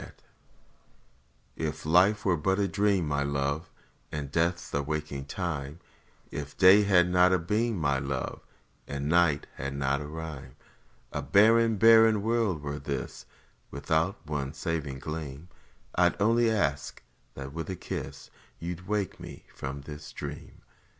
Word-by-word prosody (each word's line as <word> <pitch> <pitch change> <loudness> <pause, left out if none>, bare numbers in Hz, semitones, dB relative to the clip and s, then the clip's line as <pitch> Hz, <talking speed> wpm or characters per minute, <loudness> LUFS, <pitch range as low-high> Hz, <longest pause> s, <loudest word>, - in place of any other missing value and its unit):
IF - - -10 1.4
If 75 -2 -4
life 90 +6 +4
were 95 -3 +3
but 95 +5 0
a 100 -1 +1
dream, 100 -2 +1
my 70 -1 0
Love, 70 +3 -1 0.4
And 70 -2 -5
death 85 +3 0
the 70 - 0
waking 75 -1 -4
time; 75 -2 -4 0.5
If 75 0 -6
day 95 +2 +8
had 95 -4 +4
not 90 +1 +4
a 95 - +4
beam, 105 +6 0
my 70 -4 +1
Love, 70 -1 -4 0.5
And 70 0 -4
night 85 -3 +3
had 70 +1 -4
not 70 +1 0
a 75 - -6
rhyme, 75 -5 -7 0.6
A - - -2
barren, 115 +3 +4
barren 110 -1 +6
world 110 -9 0
were 70 0 -4
this 70 -2 -5 0.4
Without 80 +7 0
one 75 -2 -3
saving 80 -4 -3
gleam; 75 +2 -6 0.4
I - - +4
'd - - -9
only 115 +2 +3
ask 75 -11 -1 0.3
that 70 0 -7
with 80 +1 -5
a 95 - -3
kiss - - -7 0.3
You 85 +1 -4
'd 90 +3 -15
wake 105 -3 -2
me - - -10
from 70 +1 -6
the 75 +1 -9
dream. - - -8
80 Hz, 150 wpm, -28 LUFS, 70-95 Hz, 1.4 s, day